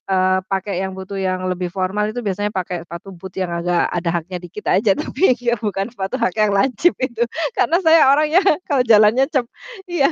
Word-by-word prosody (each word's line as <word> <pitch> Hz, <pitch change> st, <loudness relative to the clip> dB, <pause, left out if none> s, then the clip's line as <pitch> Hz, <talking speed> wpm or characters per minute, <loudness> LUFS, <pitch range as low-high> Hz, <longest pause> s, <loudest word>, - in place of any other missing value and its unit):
eee, 185 Hz, 0 st, +2 dB
pakai 195 Hz, 0 st, -3 dB
yang 190 Hz, -, -7 dB
butuh 190 Hz, +1 st, -7 dB
yang 185 Hz, -1 st, -2 dB
lebih 180 Hz, -1 st, -3 dB
formal 195 Hz, +3 st, -1 dB
itu 215 Hz, +3 st, -4 dB
biasanya 205 Hz, 0 st, -2 dB
pakai 180 Hz, -2 st, -4 dB
sepatu 170 Hz, +4 st, -9 dB
boot 190 Hz, +1 st, -10 dB
yang 185 Hz, -2 st, -3 dB
agak 175 Hz, 0 st, +1 dB
ada 170 Hz, -1 st, -2 dB
haknya 180 Hz, +2 st, -7 dB
dikit 180 Hz, +4 st, -6 dB
aja. 200 Hz, -1 st, +3 dB
Tapi 275 Hz, -, +1 dB
iya 240 Hz, -1 st, 0 dB
bukan 205 Hz, 0 st, -3 dB
suatu 195 Hz, 0 st, -4 dB
hak 185 Hz, -, +1 dB
yang 210 Hz, -1 st, +3 dB
lancip 255 Hz, -, +2 dB
itu. 235 Hz, -2 st, -2 dB, 0.3 s
Karena 325 Hz, -, +2 dB
saya 320 Hz, -4 st, +6 dB
orangnya 305 Hz, +4 st, +3 dB, 0.3 s
kalau 275 Hz, -4 st, +2 dB
jalannya 220 Hz, +3 st, +5 dB
cep 260 Hz, -5 st, +1 dB, 0.4 s
iya. 300 Hz, -6 st, +3 dB
200 Hz, 195 wpm, -19 LUFS, 185-240 Hz, 0.4 s, saya